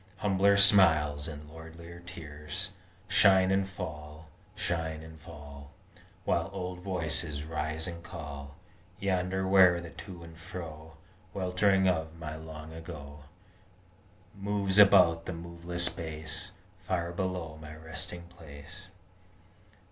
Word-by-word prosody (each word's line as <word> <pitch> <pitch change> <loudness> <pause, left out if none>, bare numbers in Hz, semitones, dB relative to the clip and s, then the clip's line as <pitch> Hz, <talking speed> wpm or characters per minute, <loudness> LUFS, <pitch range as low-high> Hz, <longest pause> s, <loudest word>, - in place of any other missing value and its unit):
Humbler 100 0 +4
smiles 80 -8 +5
and 75 -1 -7
lordlier 80 +2 -10
tears 75 -4 -6 0.4
Shine 95 -1 +6
and 95 0 +2
fall, 75 -3 -7 0.3
shine 80 -5 -2
and 80 0 -11
fall, 75 -3 -11 0.6
While - - +1
old 90 -2 -4
voices 80 -5 -2
rise 80 0 -2
and 85 -2 -6
call 70 -5 -8 0.4
Yonder 95 0 0
where 95 -2 +7
the 85 -1 -8
to 90 -4 -9
and 80 0 -11
fro 80 -2 -8 0.4
Weltering 95 +1 +3
of 80 -2 0
my 80 -1 -5
Long 80 0 -8
Ago 75 -3 -9 1.1
Moves 100 0 +1
about 90 -5 +7
the 90 - -2
moveless 85 +1 0
base 80 -2 -3 0.3
Far 85 -2 -1
below 90 -4 -3
my 75 0 -9
resting 85 +2 -6
place. 85 +1 -11
85 Hz, 115 wpm, -31 LUFS, 80-95 Hz, 1.1 s, where